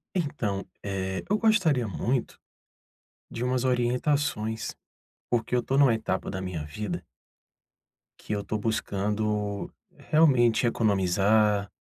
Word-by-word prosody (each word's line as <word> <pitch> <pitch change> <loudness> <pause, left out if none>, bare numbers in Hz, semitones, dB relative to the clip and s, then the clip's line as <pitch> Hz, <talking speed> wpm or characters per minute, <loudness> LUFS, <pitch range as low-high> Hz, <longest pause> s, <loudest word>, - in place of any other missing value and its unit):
Então, 120 - -1 0.2
eh, 95 -1 -3
eu 210 +1 +1
gostaria 175 - +3
muito 120 +5 -2 0.9
de 120 - -4
umas 125 0 0
orientações, 125 -2 0 0.6
porque 120 0 0
eu 125 - +3
tô 135 - -1
numa 140 -4 +6
etapa 110 -4 -2
da 95 - -4
minha 90 -5 -4
vida 90 +3 -5 1.1
que - - -5
eu 100 -1 -2
tô 110 - -2
buscando 105 -1 -1 0.3
realmente 135 -6 +3
economizar, 100 -1 +2
110 Hz, 110 wpm, -27 LUFS, 100-125 Hz, 1.1 s, numa